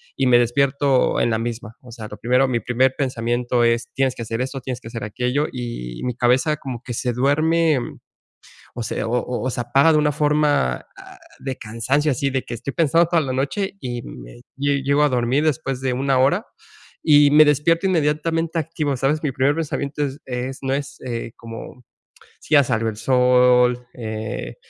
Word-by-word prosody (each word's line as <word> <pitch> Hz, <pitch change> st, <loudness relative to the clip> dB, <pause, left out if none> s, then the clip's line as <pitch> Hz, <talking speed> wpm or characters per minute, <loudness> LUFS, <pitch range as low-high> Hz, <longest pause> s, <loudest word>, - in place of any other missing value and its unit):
y 135 Hz, -, +1 dB
me 125 Hz, -1 st, +6 dB
despierto 135 Hz, +2 st, +2 dB
en 120 Hz, -, +1 dB
la 110 Hz, -, 0 dB
misma. 115 Hz, -1 st, -5 dB
O 125 Hz, -, -14 dB
sea, 110 Hz, -2 st, -8 dB
lo 105 Hz, -, -10 dB
primero 125 Hz, +5 st, +2 dB
mi 125 Hz, -2 st, 0 dB
primer 130 Hz, +2 st, +1 dB
pensamiento 120 Hz, -2 st, 0 dB
es: 115 Hz, 0 st, +1 dB
"Tienes 135 Hz, -1 st, +1 dB
que -, -, -9 dB
hacer 115 Hz, +1 st, -3 dB
esto, 130 Hz, +1 st, -4 dB
tienes 125 Hz, -1 st, -5 dB
que 115 Hz, -, -9 dB
hacer 115 Hz, -1 st, -6 dB
aquello". 125 Hz, +8 st, -1 dB
Y 115 Hz, -, -6 dB
mi 125 Hz, -2 st, -2 dB
cabeza 130 Hz, +6 st, +2 dB
como 130 Hz, -4 st, -7 dB
que 125 Hz, -, -6 dB
se 125 Hz, +1 st, -2 dB
duerme, 155 Hz, +4 st, +2 dB, 1.0 s
o 120 Hz, -, -4 dB
sea, -, -, -3 dB
o 120 Hz, +2 st, 0 dB
o 125 Hz, 0 st, -4 dB
o -, -, 0 dB
se 120 Hz, -, -3 dB
paga 140 Hz, +4 st, +6 dB
de -, -, +4 dB
una 150 Hz, 0 st, +2 dB
forma, 150 Hz, -, +2 dB, 0.2 s
ah, -, -, -13 dB, 0.2 s
de 135 Hz, -2 st, -5 dB
cansancio 130 Hz, +7 st, -1 dB
así 140 Hz, +2 st, 0 dB
de 130 Hz, -1 st, -2 dB
que -, -, -7 dB
estoy 130 Hz, +4 st, -5 dB
pensando 165 Hz, +1 st, +3 dB
toda 170 Hz, -1 st, +2 dB
la 135 Hz, -3 st, -3 dB
noche 190 Hz, +10 st, -2 dB
y 120 Hz, -1 st, -4 dB
me -, -, -11 dB, 0.2 s
lle 140 Hz, 0 st, 0 dB
llego 140 Hz, +2 st, +2 dB
a 150 Hz, -, +4 dB
dormir 125 Hz, +3 st, +1 dB
después 135 Hz, -4 st, -1 dB
de 130 Hz, -, 0 dB
una 135 Hz, +1 st, +1 dB
hora 175 Hz, -, +2 dB, 0.6 s
y 145 Hz, -2 st, +6 dB
me 155 Hz, +1 st, +8 dB
despierto 155 Hz, +5 st, +2 dB
inmediatamente 165 Hz, 0 st, 0 dB
activo, 150 Hz, -3 st, -2 dB
¿sabes? 140 Hz, +4 st, 0 dB
Mi 145 Hz, -, 0 dB
primer 135 Hz, +2 st, +2 dB
pensamiento 150 Hz, -2 st, -3 dB
es 140 Hz, +1 st, -6 dB
es 130 Hz, +1 st, -4 dB
no 135 Hz, 0 st, 0 dB
es, 140 Hz, 0 st, -4 dB
eh, 115 Hz, -2 st, -5 dB
como 115 Hz, +2 st, -10 dB, 0.6 s
si -, -, -6 dB
ya 145 Hz, -, +7 dB
salió 115 Hz, -3 st, -1 dB
el 110 Hz, -, -6 dB
sol, 125 Hz, 0 st, +3 dB
eh, 110 Hz, -, -5 dB
130 Hz, 195 wpm, -21 LUFS, 120-145 Hz, 1.0 s, me